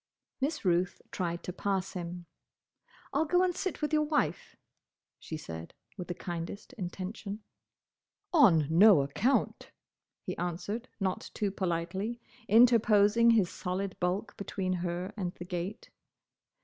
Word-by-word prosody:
Miss 275 Hz, -3 st, -2 dB
Ruth 180 Hz, 0 st, +1 dB
tried 170 Hz, -2 st, -3 dB
to 180 Hz, -, -5 dB
pass 190 Hz, -1 st, -1 dB
him. 175 Hz, -1 st, -6 dB, 0.9 s
"I'll 320 Hz, -, +2 dB
go 360 Hz, +3 st, +3 dB
and 365 Hz, -1 st, +2 dB
sit 375 Hz, -4 st, -3 dB
with 300 Hz, -, 0 dB
your 305 Hz, -, +4 dB
wife," 300 Hz, 0 st, -1 dB, 0.6 s
she 160 Hz, -, -6 dB
said, 80 Hz, -, -8 dB, 0.2 s
with 180 Hz, -3 st, -6 dB
the 175 Hz, -, -4 dB
kindest 175 Hz, +7 st, -6 dB
intention. 200 Hz, +1 st, -6 dB, 0.9 s
"On 195 Hz, -, +6 dB
no 170 Hz, 0 st, +7 dB
account!" 205 Hz, -, 0 dB, 0.5 s
he -, -, -4 dB
answered, 195 Hz, +7 st, -3 dB
not 190 Hz, -2 st, -2 dB
too 205 Hz, -2 st, 0 dB
politely, 190 Hz, +5 st, -2 dB, 0.3 s
interposing 225 Hz, -1 st, +6 dB
his 215 Hz, -6 st, +4 dB
solid 185 Hz, +1 st, -3 dB
bulk 180 Hz, +4 st, -1 dB
between 190 Hz, -2 st, -2 dB
her 180 Hz, +3 st, -3 dB
and 185 Hz, -3 st, -3 dB
the 175 Hz, -, -8 dB
gate. 180 Hz, +4 st, -5 dB
190 Hz, 130 wpm, -30 LUFS, 175-225 Hz, 0.9 s, no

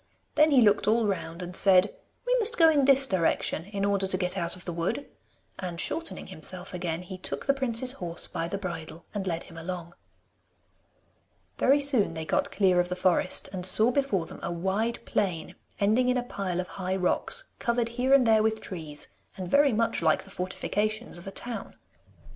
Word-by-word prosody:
Then 305 Hz, +1 st, +5 dB
he 275 Hz, -4 st, +5 dB
looked 205 Hz, -2 st, +3 dB
all 225 Hz, +1 st, +3 dB
round 180 Hz, -3 st, -3 dB
and 180 Hz, +1 st, -7 dB
said, 190 Hz, 0 st, +6 dB, 0.3 s
'We -, -, +2 dB
must 465 Hz, +1 st, +1 dB
go 325 Hz, -2 st, +7 dB
in 285 Hz, -3 st, +3 dB
this 270 Hz, 0 st, +5 dB
direction 170 Hz, -5 st, 0 dB
in 200 Hz, 0 st, -3 dB
order 200 Hz, -1 st, +1 dB
to 190 Hz, -, +1 dB
get 180 Hz, 0 st, -1 dB
out 170 Hz, +1 st, -1 dB
of 180 Hz, -, -12 dB
the 175 Hz, -, -4 dB
wood,' 170 Hz, +12 st, -2 dB, 0.5 s
and 175 Hz, -2 st, -5 dB
shortening 330 Hz, -, -3 dB
himself 185 Hz, +4 st, -5 dB
again, 175 Hz, -1 st, -3 dB
he 185 Hz, +1 st, -9 dB
took -, -, -3 dB
the 275 Hz, -, +3 dB
prince's 255 Hz, -2 st, +1 dB
horse 175 Hz, -9 st, -2 dB
by 165 Hz, -, -4 dB
the 195 Hz, -, -3 dB
bridle, 165 Hz, -3 st, -7 dB
and 200 Hz, -2 st, -3 dB
led 170 Hz, -2 st, -2 dB
him 165 Hz, -, -12 dB
along. 170 Hz, 0 st, -6 dB, 1.7 s
Very 275 Hz, +3 st, +4 dB
soon 260 Hz, -, +2 dB
they 160 Hz, 0 st, -5 dB
got 285 Hz, -, 0 dB
clear 185 Hz, -3 st, +2 dB
of 180 Hz, 0 st, +1 dB
the 180 Hz, -, -2 dB
forest, 185 Hz, 0 st, +2 dB
and 185 Hz, -1 st, -4 dB
saw 215 Hz, +6 st, +6 dB
before 245 Hz, -11 st, 0 dB
them -, -, -11 dB
a -, -, -3 dB
wide 190 Hz, +7 st, -1 dB
plain 180 Hz, -6 st, -2 dB, 0.3 s
ending 220 Hz, +5 st, +2 dB
in 250 Hz, -, +2 dB
a 245 Hz, -, -1 dB
pile 195 Hz, -6 st, -4 dB
of 180 Hz, -, -3 dB
high 185 Hz, +1 st, -1 dB
rocks, 195 Hz, -, 0 dB
covered 235 Hz, -1 st, 0 dB
here 250 Hz, +3 st, -1 dB
and 275 Hz, -2 st, +6 dB
there 220 Hz, -1 st, +5 dB
with 220 Hz, 0 st, 0 dB
trees, 155 Hz, -7 st, -6 dB, 0.3 s
and 185 Hz, -1 st, -6 dB
very 285 Hz, -1 st, +5 dB
much 230 Hz, -2 st, 0 dB
like 160 Hz, -2 st, +2 dB
the 195 Hz, -, -14 dB
fortifications 205 Hz, +3 st, -3 dB
of 175 Hz, -, -12 dB
a -, -, -5 dB
town. 240 Hz, +3 st, -4 dB
195 Hz, 200 wpm, -27 LUFS, 180-240 Hz, 1.7 s, go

